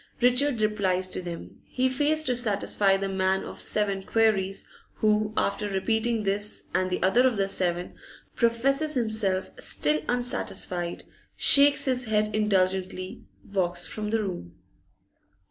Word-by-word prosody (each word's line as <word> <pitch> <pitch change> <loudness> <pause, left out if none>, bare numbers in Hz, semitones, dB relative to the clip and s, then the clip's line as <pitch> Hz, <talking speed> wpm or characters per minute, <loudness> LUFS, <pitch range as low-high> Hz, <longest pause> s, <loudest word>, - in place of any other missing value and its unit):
Richard 250 0 +2
replies 190 -3 0
to - - -2
them. 175 -2 -9
He 255 0 0
fails 295 +4 0
to 255 -5 0
satisfy 205 -4 +2
the 195 0 -3
man 190 0 0
of - - -9
seven 200 -2 +1
queries, 195 -2 0 0.3
who, 215 0 +1
after 205 +1 -1
repeating 220 +3 -1
this 205 +1 -3
and 185 0 0
the 180 - -2
other 235 +8 +4
of 240 -4 -1
the 195 -1 +1
seven, 180 -2 -2 0.4
professes 275 +6 +1
himself 220 -6 0
still 150 +1 +1
unsatisfied, 185 -8 -2 0.3
shakes 280 +1 +6
his 255 -2 +1
head 215 -1 0
indulgently, 190 -3 -1 0.3
walks 175 -2 -1
from 210 -1 -4
the 225 0 0
room. 130 - -6
210 Hz, 135 wpm, -26 LUFS, 190-235 Hz, 0.4 s, shakes